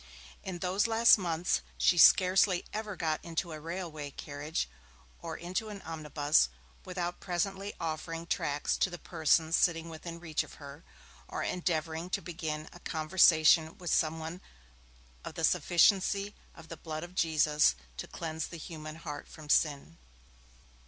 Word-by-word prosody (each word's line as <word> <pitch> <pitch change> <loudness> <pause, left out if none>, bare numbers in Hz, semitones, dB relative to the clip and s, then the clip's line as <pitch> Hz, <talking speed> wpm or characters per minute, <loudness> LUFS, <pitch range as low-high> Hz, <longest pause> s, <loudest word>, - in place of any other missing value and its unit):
In 185 -2 -5
those 190 +5 +2
last 225 -1 +6
months, 175 -1 0 0.2
she - - +4
scarcely 185 +1 +6
ever 215 -1 -4
got 160 -3 -1
into 170 +1 -3
a 155 - -6
railway 165 -3 -5
carriage 145 - -4 0.5
or - - -5
into 185 +5 -3
an 205 -2 -8
omnibus, 150 - +1 0.3
without 180 -1 -4
presently 195 +2 -3
offering 165 +1 -4
tracts 145 -3 -1
to - - +2
the 175 - -7
persons 160 0 +2
sitting 165 -1 +2
within 165 +1 -8
reach 160 -3 -1
of - - -10
her, 145 +2 -11 0.4
or - - -4
endeavouring 165 -1 -2
to - - -1
begin 160 -3 -4
a 175 - -12
conversation 160 -1 +4
with 175 -2 -2
some 160 0 +2
one 160 +3 -6 0.8
of - - -8
the - - -4
sufficiency 195 +3 +3 0.2
of 165 0 -14
the 165 - -7
Blood 155 -1 -6
of 175 +1 -9
Jesus 155 -3 +3 0.2
to - - -5
cleanse 160 -2 -4
the 170 - -8
human 155 -1 -8
heart 160 -3 -7
from 155 -2 -12
sin. 150 +2 +1
165 Hz, 150 wpm, -31 LUFS, 155-180 Hz, 0.8 s, last